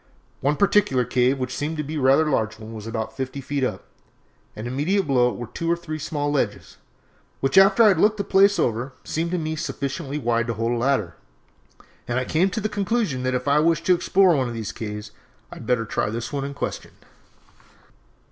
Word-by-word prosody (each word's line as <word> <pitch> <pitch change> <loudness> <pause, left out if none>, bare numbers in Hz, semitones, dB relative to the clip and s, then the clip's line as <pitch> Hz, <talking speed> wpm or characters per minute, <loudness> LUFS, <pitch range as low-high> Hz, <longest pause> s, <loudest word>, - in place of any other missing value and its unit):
"One 145 +3 +1
particular 185 -10 +3
cave 125 +2 +2
which 130 -1 -4
seemed 155 +2 -3
to 150 - -2
be 155 +2 -5
a - - -2
rather 135 +4 +4
large 110 -6 0
one 110 +1 -10
was 110 0 -8
about 115 -1 -4
fifty 130 +1 -4
feet 140 0 -3
up, 105 -6 -2 0.7
and 110 - -6
immediately 150 +11 0
below 125 -4 +3
it - - -6
were 120 - -5
two 165 +9 -3
or - - +3
three 160 -2 -6
small 145 -1 -2
ledges, 125 -8 -2 0.6
which, 135 0 0
after 195 +4 +7
I 215 - +7
had 185 -5 +2
looked 215 +3 +3
the 200 - -1
place 200 +1 +4
over, 120 +3 -1
seemed 165 +2 -2
to 180 - -1
me 155 -2 -3
to 160 - -3
be - - -3
sufficiently 140 -1 -4
wide 120 -3 0
to 115 - -2
hold 115 +2 -1
a - - +1
ladder; 115 -8 0 0.9
and 120 +1 -1
I 130 - 0
came 175 +8 +2
to 190 - -3
the 215 - -1
conclusion 205 - -1
that 130 0 -1
if 125 +1 -3
I 145 +1 +4
wished 165 +1 +2
to 185 - +5
explore 180 0 +3
one 130 -3 0
of 120 - -5
these 110 -3 -4
caves 105 -1 -6 0.4
I - - -9
had - - -10
better 120 -2 +1
try 105 - -1
the 115 +2 -4
one 140 -2 -2
in 140 0 -6
question. - - -5
140 Hz, 225 wpm, -23 LUFS, 120-165 Hz, 0.9 s, after